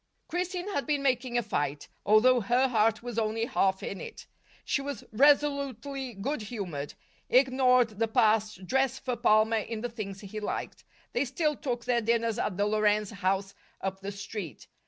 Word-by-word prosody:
Christine 360 +2 -3
had 285 - -2
been 290 -2 0
making 250 -2 +1
a 240 - +1
fight, 145 -8 -2 0.2
although 240 +4 +6
her 245 +6 +3
heart 225 -1 +2
was 240 -2 -3
only 225 +1 0
half 195 -7 +1
in 195 - -5
it. - - -9 0.4
She 275 - 0
was 280 0 -5
resolutely 275 -1 +2
good 245 +7 -3
humored, 190 -10 -5 0.3
ignored 255 -2 +4
the 225 - +2
past, 215 -4 +2
dressed 265 +5 0
for 250 -2 0
Palmer 225 -1 +3
in 220 0 -4
the 245 - -3
things 200 -4 -6
he 210 +1 -6
liked. 210 - -4 0.3
They 245 - +2
still 300 +3 0
took 245 -5 -4
their 245 -1 +2
dinners 230 0 +1
at 185 - -2
the 205 - +2
Lorenz 210 0 +2
house 195 0 -1 0.3
up 190 0 -3
the 195 +1 -5
street. 200 -3 -7
230 Hz, 170 wpm, -29 LUFS, 210-260 Hz, 0.4 s, although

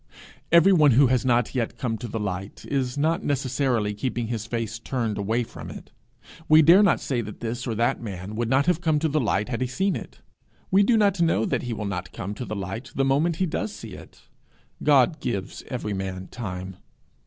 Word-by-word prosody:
Everyone 170 -4 +6
who 135 +4 +6
has 125 - +1
not 120 -1 +2
yet 120 -2 -2
come 115 -1 -2
to 120 - -5
the 110 0 -4
light 95 -1 -5
is 130 -2 -2
not 160 +5 +1
necessarily 130 -6 0
keeping 120 +1 -3
his 110 -2 -3
face 115 -1 -3
turned 115 -3 -2
away 110 +4 0
from - - -9
it. - - -10 0.6
We 155 +1 +8
dare 175 +6 +7
not 200 -4 +4
say 125 -4 -1
that 105 -2 -8
this 120 +2 -4
or 115 - -2
that 115 +2 +1
man 100 -2 -6
would 115 +1 -2
not 135 +2 +3
have 175 -1 +1
come 160 -3 +2
to 160 +2 +1
the 155 0 +1
light 105 -2 0
had 120 0 -3
he 130 - +1
seen 190 +10 0
it; - - -9 0.5
we 195 +2 +5
do 225 +3 +4
not 200 -4 +2
know 165 -9 +2
that - - -1
he 125 -2 -4
will 110 -1 -4
not 90 -3 -4
come 100 +2 -5
to 125 +4 -6
the 110 - -5
light 100 +7 -5
the 135 - +2
moment 150 +5 +2
he 185 - 0
does 110 - -3
see 100 - -9
it. - - -13 0.6
God 145 +1 +4
gives 100 -6 -4
every 120 -5 -3
man 95 -1 -5
time. 95 -5 -6
120 Hz, 215 wpm, -25 LUFS, 105-145 Hz, 0.6 s, We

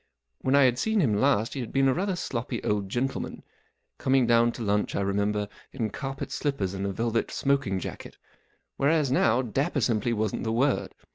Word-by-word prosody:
When 130 +1 +1
T 140 - +6
had 125 -1 +2
seen 220 +4 +1
him 130 - +3
last 115 0 +2
he 140 - -4
had 120 - -5
been 135 0 +3
a 130 - +4
rather 190 +3 -1
sloppy 125 -9 -4
old 100 -2 -1
gentleman—coming 130 +1 -2
down 120 0 +4
to 120 - -6
lunch, 105 0 0
I - - 0
remember, 100 +1 0 0.2
in 115 -6 -3
carpet 135 +2 -5
slippers 135 -9 -1
and 100 0 -3
a - - -1
velvet 115 +3 -1
smoking 135 -9 0
jacket; - - -8 0.6
whereas 145 -1 +2
now 120 -1 +3
dapper 135 +5 -1
simply 120 -1 +1
wasn't 110 -2 -1
the 110 - -1
word. 135 +4 +1
120 Hz, 185 wpm, -27 LUFS, 105-135 Hz, 0.6 s, T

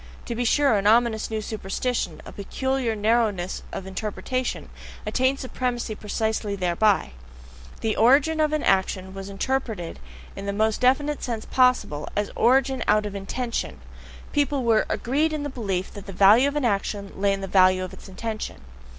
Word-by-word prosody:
To 235 - -3
be 240 +1 -2
sure, 280 +2 +3
an 200 - 0
ominous 225 0 +3
new 220 -1 -2
superstition, 220 +4 -3
a - - -9
peculiar 260 +3 -2
narrowness 210 -4 0
of 190 - -6
interpretation, 215 +6 -3 0.4
attained 260 +1 +1
supremacy 250 -3 -3
precisely 215 0 -2
thereby: 185 - +2 0.7
the 220 -1 0
origin 280 +7 +4
of 305 -1 +2
an 305 -1 0
action 190 0 +1
was 195 0 -7
interpreted 215 -4 -3 0.4
in 195 - -6
the 200 - -1
most 220 +2 +1
definite 285 +4 +2
sense 230 -3 -4
possible, 250 - +2
as 205 0 -1
origin 265 +1 +3
out 210 0 +3
of 205 - -5
an 200 - -4
INTENTION; 245 0 -3 0.5
people 290 -2 +1
were 225 -2 +3
agreed 300 +6 0
in 300 -1 -2
the 290 - -3
belief 195 -8 -3
that 205 -1 -10
the 195 - -7
value 210 +8 +6
of 285 - -3
an 295 -3 0
action 200 -2 -1
lay 200 +1 +1
in 195 0 -2
the - - -3
value 185 -1 +4
of 185 - -7
its - - -12
intention. 215 +3 -5
220 Hz, 170 wpm, -24 LUFS, 200-255 Hz, 0.7 s, value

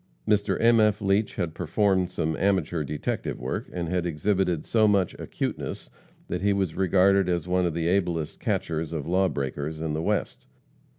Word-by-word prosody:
Mr. 105 -1 +2
M. 115 0 +5
F. 105 -1 +3
Leach 100 +1 +1
had 85 -5 -2
performed 95 +1 +1
some 80 -3 -2
amateur 95 -5 +1
detective 75 +1 -3
work, - - -4
and 85 -2 -3
had 90 +1 0
exhibited 90 0 0
so 110 -2 +3
much 100 -3 +2
acuteness - - -4 0.4
that - - -3
he 100 +1 +3
was 95 -5 -1
regarded 95 0 +3
as 85 -1 -1
one 90 0 +2
of 80 - -3
the 85 -1 -1
ablest 85 -4 0
catchers 80 0 -2
of 75 -4 -3
lawbreakers 80 -4 -1
in 80 -1 -2
the 80 - -1
West. - - -2
90 Hz, 170 wpm, -26 LUFS, 80-100 Hz, 0.4 s, M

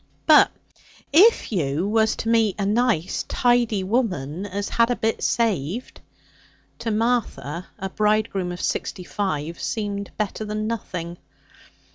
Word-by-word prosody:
'But - - +7 0.6
if 405 - +5
you 165 -2 0
was 220 +1 +2
to 225 - -3
meet 225 -4 +3
a 200 - -1
nice 215 -5 +1
tidy 240 -5 +2
woman 190 - -1
as 200 +1 -3
had 230 0 +3
a 245 - +1
bit 225 -1 -1
saved?' 220 - -1 0.8
To 230 -1 -3
Martha, 215 - -1
a 190 - -4
bridegroom 210 -4 +1
of 175 - -6
sixty 185 - -2
five 170 -5 -3
seemed 205 -2 -3
better 215 0 -2
than 215 0 -3
nothing. 180 -6 -4
210 Hz, 130 wpm, -23 LUFS, 180-230 Hz, 0.8 s, But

